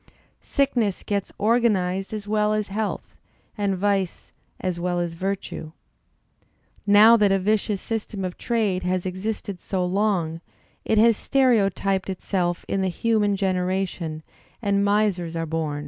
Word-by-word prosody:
Sickness 240 -8 0
gets 200 -2 -2
organized 200 -4 +1
as 210 -1 -5
well 210 0 +2
as 215 -2 -1
health, 210 +1 -3 0.4
and 200 -3 0
vice 195 -2 -1 0.3
as 180 -2 -2
well 175 0 -1
as 170 -1 -2
virtue. 185 -3 -4 1.1
Now 210 +3 +8
that 205 -2 +3
a 195 - +4
vicious 205 0 0
system 210 -3 -3
of 180 - -4
trade 215 -6 0
has 180 0 -1
existed 190 +1 -4
so 185 0 -2
long, 180 -4 0 0.4
it 220 - +1
has 225 0 +5
stereotyped 195 -7 +1
itself 180 -2 -2
in 195 - -1
the 190 - +1
human 210 +2 +1
generation, 185 -4 -2 0.4
and 200 -3 +1
misers 200 -5 +1
are 165 0 -1
bom. 155 -2 -2
195 Hz, 135 wpm, -24 LUFS, 180-210 Hz, 1.1 s, Now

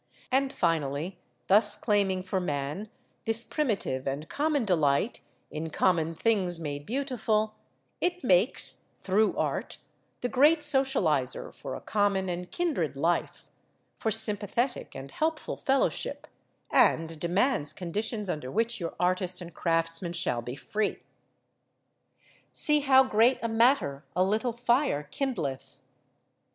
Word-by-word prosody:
And, 270 +1 +2
finally, 165 - -1 0.3
thus 205 +1 +4
claiming 200 -4 +1
for 190 0 -1
man 150 +4 -3 0.4
this 225 +1 +2
primitive 210 - -2
and 140 +3 -3
common 295 -4 0
delight 160 - +1 0.3
in 160 +1 -4
common 165 0 +1
things 185 -4 0
made 145 -2 -5
beautiful, 225 -4 -1 0.5
it 360 0 -1
makes, 190 +1 +2
through 205 +3 +1
art, - - -2 0.4
the 245 - 0
great 300 +6 +4
socialiser 265 - +2
for - - -7
a - - -8
common 200 -2 0
and 180 0 -4
kindred 270 - -1
life, 170 +5 -1 0.5
for 225 - 0
sympathetic 220 +3 +1
and 135 +1 -8
helpful 320 0 -2
fellowship, 270 0 0 0.5
and 165 -1 +3
demands 175 - +1
conditions 205 +6 -3
under 150 -7 -3
which 230 - 0
your 170 -2 -5
artist 180 0 +1
and 175 -2 -9
craftsman 165 +1 -1
shall 145 -8 -1
be 120 +2 -6
free. 210 +7 -3 1.5
"See 300 -1 +4
how 265 -2 +5
great 240 +1 +3
a - - +1
matter 225 - +2
a 185 - +3
little 215 +5 0
fire 240 - +1
kindleth." 155 - -3
195 Hz, 125 wpm, -28 LUFS, 165-240 Hz, 1.5 s, how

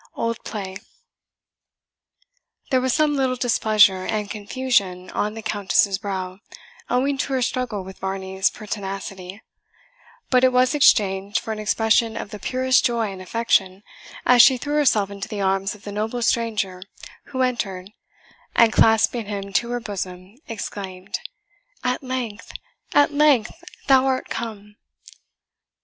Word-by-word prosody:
OLD 230 0 -2
PLAY. 190 -3 -5 1.9
There 260 -1 +3
was 260 0 +1
some 305 +2 +2
little 260 -2 +1
displeasure 215 -6 +3
and 210 0 -3
confusion 205 -5 -1
on 210 +1 -2
the 225 - -7
Countess's 200 -1 +1
brow, 190 -2 -5 0.5
owing 270 +2 +1
to 275 - -1
her 260 -1 +1
struggle 240 -5 -2
with 190 0 -11
Varney's 190 0 -1
pertinacity; 195 -1 -7 0.9
but 255 -1 +4
it 260 - +5
was 255 +2 +3
exchanged 200 -8 +3
for 225 - -6
an 215 - -4
expression 220 +1 +2
of 200 - -6
the 210 - -7
purest 255 +2 +2
joy 230 -4 0
and 190 -1 -9
affection, 195 -1 0 0.4
as 245 -1 +7
she 260 +1 +6
threw 290 +4 -4
herself 215 -9 +2
into 200 0 -6
the 210 -2 -5
arms 195 +1 0
of 210 - -18
the 205 - -7
noble 220 +4 -2
stranger 215 -6 0 0.4
who 260 -2 -1
entered, 195 -7 -2 0.6
and 230 -2 +5
clasping 225 0 +3
him 200 -1 -5
to 235 +3 +1
her 245 0 -2
bosom, 190 -3 -6
exclaimed, 195 -4 -7 0.7
"At 250 0 -1
length 255 -5 -5 0.4
at 290 0 +5
length 285 -7 +4 0.3
thou 265 -1 +5
art 260 -1 -1
come!" 210 -2 -6
215 Hz, 140 wpm, -22 LUFS, 195-250 Hz, 1.9 s, as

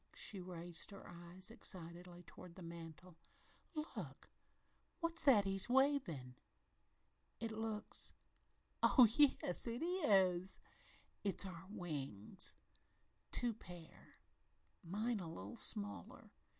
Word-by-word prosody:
she 200 - -3
raised 175 -2 -5
her 200 -1 -9
eyes 175 +4 -3
excitedly 175 -5 -6
toward 170 +1 -12
the 185 - -9
mantel, 165 0 -9 0.6
"Look! 305 +1 -5 0.7
What's 335 -1 0
that 225 -8 +7
he's 195 +2 +3
wavin'? 250 - +3 1.1
It 230 -1 -2
looks 220 -1 -3 0.7
oh 250 -3 +8
yes, 270 - +4
it 235 +6 -2
is 195 - +3 0.6
it's 200 -1 +1
our 185 0 -7
wings 145 - -3 0.8
two 240 -1 +2
pairs 175 -6 -12 0.7
mine 215 +6 0
a 175 - -5
little 100 - -6
smaller. 100 -3 -2
185 Hz, 100 wpm, -40 LUFS, 170-225 Hz, 1.1 s, oh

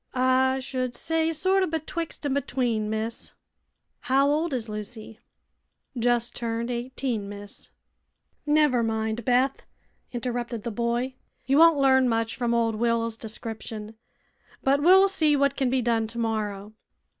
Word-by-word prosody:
"I 260 +1 +3
should 255 -1 -3
say 325 0 0
sorter 375 +4 +2
betwixt 320 0 -4
an' 280 - 0
between, 245 -6 -1
miss." 220 +1 -4 0.7
"How 270 +2 +2
old 310 +3 +1
is 245 -4 -2
Lucy?" 215 +1 -8 0.7
"Jes' 240 -1 +1
turned 235 0 -3
eighteen, 240 -3 -3
miss." 205 0 -10 0.8
"Never 295 -5 +3
mind, 220 0 -1
Beth," 255 +3 +1 0.5
interrupted 240 -2 -3
the 235 - -3
boy; 235 +3 -1 0.3
"you 275 +3 +3
won't 330 -2 +7
learn 265 -2 +4
much 225 0 0
from 235 -1 0
old 230 -1 +1
Will's 230 0 0
description. 220 -1 -7 0.7
But 275 +1 +3
we'll 380 +5 +7
see 315 -6 +2
what 280 -1 +2
can 265 -3 0
be 255 0 +1
done 225 -2 +1
tomorrow. 215 -3 -3
245 Hz, 135 wpm, -26 LUFS, 225-275 Hz, 0.8 s, won't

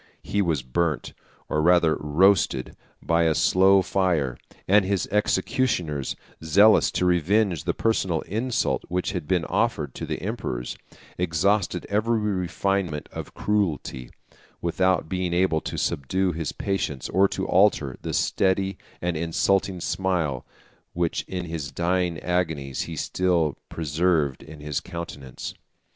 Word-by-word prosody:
He 100 - 0
was 80 -8 0
burnt, 75 +4 -1 0.3
or 75 - 0
rather 85 -1 +4
roasted, 75 -2 +2 0.3
by 85 0 +2
a 80 -1 +2
slow 95 +1 +5
fire; 85 -12 +1 0.3
and 100 +2 +5
his 95 -2 0
executioners, 95 - 0 0.3
zealous 100 +7 +5
to 90 - +1
revenge 90 0 +2
the - - 0
personal 95 -7 +1
insult 115 +4 -1
which 90 +1 -1
had 90 -6 -4
been 90 -3 +1
offered 80 - 0
to - - -6
the - - -3
emperors, - - -4 0.4
exhausted 90 +2 +1
every 110 +3 +1
refinement 95 -4 -1
of - - -8
cruelty, 80 -11 -1 0.5
without 95 +1 +1
being 90 -1 -1
able 90 -3 +2
to - - -5
subdue 90 +7 0
his 80 -3 -3
patience, 95 -9 -2
or 95 +2 +4
to - - -3
alter 90 -9 +3
the - - -4
steady 95 0 +1 0.2
and 90 -1 0
insulting 90 +4 +1
smile 85 -8 -1 0.5
which 85 -1 0
in 90 -1 -4
his 80 -4 -5
dying 90 -1 0
agonies 80 -7 -1
he 80 - -5
still 85 -1 +1
preserved 80 -2 0
in 75 -1 -11
his 75 -2 -2
countenance. 85 -7 -7
90 Hz, 130 wpm, -25 LUFS, 80-95 Hz, 0.5 s, slow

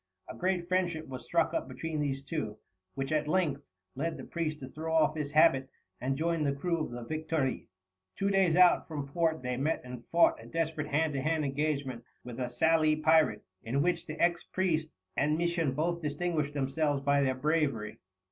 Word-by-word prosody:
A - - -8
great 180 -1 -1
friendship 175 -3 0
was 130 -2 -7
struck - - +1
up - - -1
between 160 -2 -4
these 140 -2 -1
two, 135 -8 -4 0.4
which 135 +1 -3
at 150 -1 +1
length 155 -5 +1 0.3
led 165 +5 -2
the - - -8
priest 155 -3 -3
to 130 - -6
throw 160 +3 -5
off 160 -1 +4
his 150 -2 -4
habit 135 -4 +5 0.3
and 135 +2 -1
join 165 0 0
the 140 -1 +1
crew 170 +4 -1
of 155 - -2
the 120 0 -6
Victoire. 155 -1 -1 0.6
Two 200 0 0
days 190 -4 +3
out 180 -1 +5
from 145 -3 -4
port 160 0 0
they 125 0 -2
met 150 +5 0
and 125 -1 -8
fought 170 0 +4
a - - -12
desperate 160 -2 -2
hand 150 +1 +1
to 135 - -1
hand 155 +1 0
engagement 140 -3 -2 0.2
with 125 0 -8
a 125 -1 -2
Sallee 155 +4 +3
pirate, 155 -8 +3 0.2
in 135 +5 0
which 175 -1 0
the 155 0 -6
ex 170 0 +2
priest 165 -4 0 0.3
and 150 +2 +2
Misson 170 -4 0
both 170 +4 -1
distinguished 150 -1 -1
themselves 145 +1 0
by 140 0 +3
their 130 -1 +1
bravery. 140 -6 0
155 Hz, 195 wpm, -31 LUFS, 135-165 Hz, 0.6 s, habit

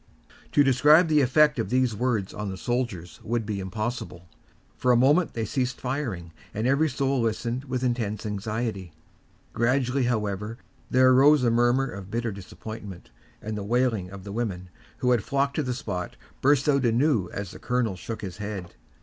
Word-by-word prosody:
To 145 - +6
describe 150 +6 +5
the 150 -1 +4
effect 150 +3 +4
of - - -1
these 125 -3 +1
words 110 -4 -1
upon 105 -1 -4
the 95 - -5
soldiers 120 -8 -3
would 115 0 -1
be 105 -2 -3
impossible. 95 -2 -5 0.5
For 125 - +2
a 120 - +5
moment 145 +8 +3
they 115 -1 -1
ceased 125 +2 -2
firing, 120 - -4 0.2
and 110 +2 -1
every 140 +5 +3
soul 135 -1 0
listened 115 +3 -2
with 130 -1 -3
intense 115 -5 -1
anxiety. 105 -3 -3 0.6
Gradually, 125 +2 +1
however, 105 -2 -2 0.3
there 130 0 +5
arose 140 +2 +6
a 120 - +3
murmur 120 +3 +3
of 100 -6 -8
bitter 115 +1 -2
disappointment, 100 - -9 0.3
and 110 0 -4
the 105 - -4
wailing 115 -4 0
of 95 0 -10
the 100 - -7
women, 95 -5 -4 0.3
who 125 -2 +1
had 120 -4 +2
flocked 140 0 0
to - - +2
the 130 -3 -2
spot, 90 -8 -4 0.3
burst 140 0 +3
out 140 -2 +3
anew 120 - +2
as 100 -2 -5
the - - -11
colonel 125 -5 0
shook 110 +4 -7
his 95 -3 -6
head. 100 -4 -6
120 Hz, 175 wpm, -26 LUFS, 105-130 Hz, 0.6 s, To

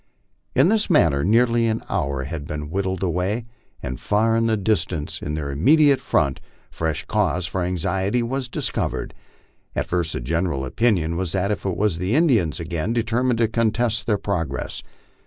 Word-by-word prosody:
In 140 +7 +5
this 215 0 +2
manner 80 - +4
nearly 115 +3 +3
an 110 0 -1
hour 70 -1 -1
had 70 0 -6
been 75 0 -5
whiled 95 0 -2
away, 95 +6 -1 0.4
when 65 0 -4
far 110 - +1
in 115 0 +2
the 110 -1 +2
dis 100 -3 +2
tance, 80 -5 -5
in 75 - -3
their 75 -2 -3
immediate 140 - +4
front, 70 - +1 0.3
fresh 80 -2 -2
cause 90 -1 0
for 90 +3 -2
anxiety 95 +6 0
was 130 +2 -2
discovered. - - -2 0.6
At - - 0
first 85 -2 -1
the - - -2
general 80 +1 -1
opinion 85 - +1
was 90 -2 -2
that 100 +1 0
it 105 - -3
was 95 -2 0
the 95 +7 0
Indians 120 - +3
again, 85 +5 -2
determined 120 +1 +1
to 115 -1 +3
contest 115 0 0
their 105 -3 +2
progress. 85 -9 -3
95 Hz, 170 wpm, -22 LUFS, 80-115 Hz, 0.6 s, In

